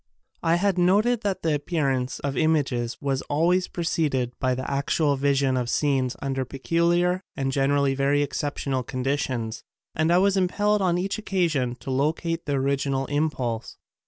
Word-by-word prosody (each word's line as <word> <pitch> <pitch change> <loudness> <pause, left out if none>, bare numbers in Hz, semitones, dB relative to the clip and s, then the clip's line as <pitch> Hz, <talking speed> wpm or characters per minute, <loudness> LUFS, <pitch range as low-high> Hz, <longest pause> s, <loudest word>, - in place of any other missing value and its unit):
I 165 0 +3
had 190 +1 +1
noted 210 +7 +3
that 200 -3 -2
the 160 -2 +2
appear 145 -1 0
ance 130 -1 -2
of 140 -1 -2
images 135 -6 0
was 135 -1 -1
always 175 +5 +2
preceded 150 -7 -1
by 130 -1 +1
actual 140 +3 0
vision 135 -1 +1
of 125 -2 -1
scenes 135 -2 +1
under 135 -1 -1
peculiar 170 +7 +1
and 135 -1 -1
generally 140 0 +2
very 140 +2 +2
exceptional 140 -2 -2
conditions 125 -3 -2 0.3
and 160 +1 +1
I 175 - +5
was 195 +1 +3
impelled 205 +3 +1
on 175 -2 +2
each 195 +4 -2
occasion 165 - 0
to 135 - -5
locate 160 +5 -1
the 145 - 0
original 135 0 0
impulse. 130 -6 -2
145 Hz, 155 wpm, -25 LUFS, 135-170 Hz, 0.3 s, I